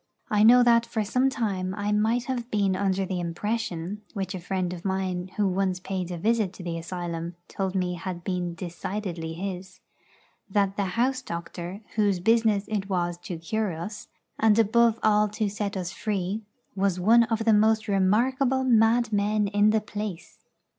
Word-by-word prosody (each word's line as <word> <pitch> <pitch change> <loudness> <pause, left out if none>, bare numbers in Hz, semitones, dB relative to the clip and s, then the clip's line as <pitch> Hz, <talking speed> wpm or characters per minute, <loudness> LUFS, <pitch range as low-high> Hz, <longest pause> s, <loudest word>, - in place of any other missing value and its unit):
I 210 -1 +3
know 245 +3 +8
that 235 -1 +4
for 220 -2 -1
some 255 +6 +2
time 190 -7 -2
I 205 0 -2
might 220 +3 +2
have 245 -2 -4
been 200 -4 +1
under 195 0 0
the 185 -1 -3
impression 185 +1 -3
(which 195 -1 -3
a 185 - -4
friend 180 0 -2
of 175 -1 -8
mine, 190 -2 -2
who 205 -1 +2
once 185 -1 0
paid 185 -1 -4
a 175 - -4
visit 215 0 +1
to 185 - -10
the 170 -1 -3
asylum, 170 0 -5
told 190 -1 -3
me 180 -1 0
had 175 0 -5
been 180 -2 -2
decidedly 175 -1 -5
his) 185 +1 -6 0.7
that 195 0 +1
the 200 - 0
house 255 +2 +1
doctor, 175 -1 -6 0.2
whose 205 -4 +2
business 220 0 +2
it 205 -2 -3
was 175 -2 0
to 175 -1 -6
cure 205 +4 -2
us, 205 +6 -7 0.3
and 220 -1 +4
above 230 +1 +4
all 210 -1 +4
to 210 +1 -2
set 205 -1 -3
us 180 -1 -3
free, 200 0 -2 0.3
was 195 -2 +1
one 230 +5 +5
of 225 -1 -1
the 225 - +5
most 215 +1 +3
remarkable 245 +7 +2
madmen 220 -3 +3
in 205 +1 +4
the 220 0 +2
place. 210 -4 -6
200 Hz, 175 wpm, -26 LUFS, 180-220 Hz, 0.7 s, know